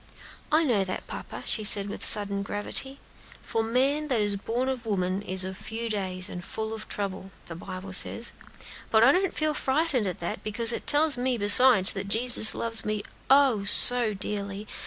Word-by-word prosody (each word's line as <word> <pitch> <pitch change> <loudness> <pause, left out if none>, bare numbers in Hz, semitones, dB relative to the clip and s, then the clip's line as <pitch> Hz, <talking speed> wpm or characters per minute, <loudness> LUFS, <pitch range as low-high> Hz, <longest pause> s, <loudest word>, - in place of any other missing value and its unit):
"I 310 +2 +2
know 235 -10 0
that, 185 -1 -7
papa," - - -10
she 215 - +1
said 200 -1 +3
with 205 - -7
sudden 200 -2 +4
gravity, 210 +7 -5 0.4
"'for 225 - -3
man 270 +7 -2
that 250 -6 -2
is 205 -1 -1
born 235 +6 -4
of 255 -3 -6
woman 185 -2 -3
is 185 -2 -2
of 190 0 -7
few 225 +3 -7
days, 185 -3 -4
and 180 - -9
full 220 +4 -6
of 220 -1 -9
trouble,' 195 -1 -6 0.2
the 170 - -10
Bible 185 +3 -10
says; 230 +5 0 0.6
but 220 0 +2
I 265 - +5
don't 375 +3 -2
feel 310 -1 -1
frightened 275 -5 -2
at 180 - -6
that, 170 - -7
because 230 +2 +2
it - - -7
tells 295 -3 +3
me, 250 0 -1
besides, 205 -1 +6
that 195 0 -6
Jesus 225 +1 +2
loves 225 -1 -1
me, 215 -1 -4 0.3
_oh, 265 -8 +2
so 235 -1 +7
dearly! 200 +1 -7
215 Hz, 185 wpm, -25 LUFS, 200-250 Hz, 0.6 s, so